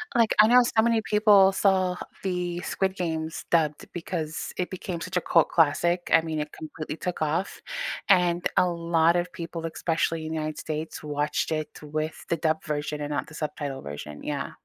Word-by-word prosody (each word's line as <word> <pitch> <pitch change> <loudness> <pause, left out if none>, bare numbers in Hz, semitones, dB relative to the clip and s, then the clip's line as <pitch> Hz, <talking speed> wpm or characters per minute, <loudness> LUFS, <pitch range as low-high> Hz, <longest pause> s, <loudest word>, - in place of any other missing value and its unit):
Like, 230 -2 +4
I 215 - +9
know 250 +1 +7
so 230 -2 +2
many 230 0 +2
people 210 -3 +5
saw 190 -2 +2 0.3
the 180 -2 -2
Squid 190 +1 -1
Games 160 -3 -3
dubbed 155 -3 +2
because 165 -3 -4
it 180 - -2
became 180 -2 -5
such 185 +2 -3
a 180 - +2
cult 165 -2 +3
classic, 170 +2 +2
I - - +7
mean, 160 -1 -3
it 150 0 -4
completely 155 0 -7
took 180 -3 -4
off, 155 +5 -1 0.5
and 175 -2 +4
a 180 - +5
lot 170 -1 +2
of 175 0 0
people, 165 -1 -6
especially 165 0 -1
in 160 - -4
the 160 - -2
United 155 0 -3
States, 155 0 -5
watched 150 +1 -1
it 155 -1 -3
with 155 +1 -4
the 170 - 0
dub 160 0 0
version 150 -1 -3
and 145 0 -3
not 145 - -2
the 150 - -12
subtitle 145 -3 -4
version, 75 +1 -8
yeah. 145 -2 -3
165 Hz, 190 wpm, -26 LUFS, 155-180 Hz, 0.5 s, I